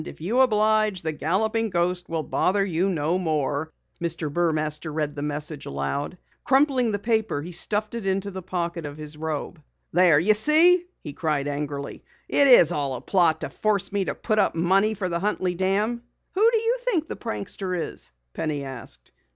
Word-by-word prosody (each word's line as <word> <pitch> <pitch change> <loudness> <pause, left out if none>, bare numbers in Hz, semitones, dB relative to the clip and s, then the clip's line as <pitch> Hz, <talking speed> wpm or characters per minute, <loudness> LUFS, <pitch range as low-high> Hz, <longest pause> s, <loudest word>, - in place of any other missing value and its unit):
IF - - -10
YOU 205 +11 0
OBLIGE, 215 -5 +2
THE 160 - -1
GALLOPING 215 +9 0
GHOST 175 0 -1
WILL 165 -1 -2
BOTHER 195 +5 +1
YOU 185 +1 0
NO 165 0 0
MORE." 155 -2 -1 0.3
Mr. 165 -3 -2
Burmaster 155 -2 -1
read 150 -1 -2
the 145 - -5
message 150 0 -4
aloud 70 - -3
and - - -18 0.3
crumpling 265 -3 +3
the 205 - 0
paper, 220 -8 -1
stuffed 210 +5 0
it 230 -4 -4
into 195 +1 -1
the 190 0 -6
pocket 170 -3 -3
of 145 +1 -9
his 150 0 -7
robe. 155 +1 -4 0.3
"There, 175 -3 +5
you 205 +7 +4
see!" 330 - +4 0.2
he 150 - -6
cried 150 -4 -1
angrily. 145 -1 -4 0.2
"It's 250 - +6
all 140 -5 -1
a 125 - -6
plot 165 0 +2
to - - -4
force 210 -3 0
me 200 -1 0
to - - -3
put 215 -2 0
up 195 - +2
money 195 +6 +2
for 190 -2 -2
the 170 -1 -2
Huntley 185 -2 0
Dam!" 200 +6 0 0.3
"Who 425 +4 +4
do 460 - +3
you 455 +3 +1
think 420 -11 0
the - - -6
prankster 180 - -4
is?" 160 - -5 0.2
Penny 150 -3 -2
asked. 115 - -9
175 Hz, 185 wpm, -25 LUFS, 155-215 Hz, 0.3 s, It's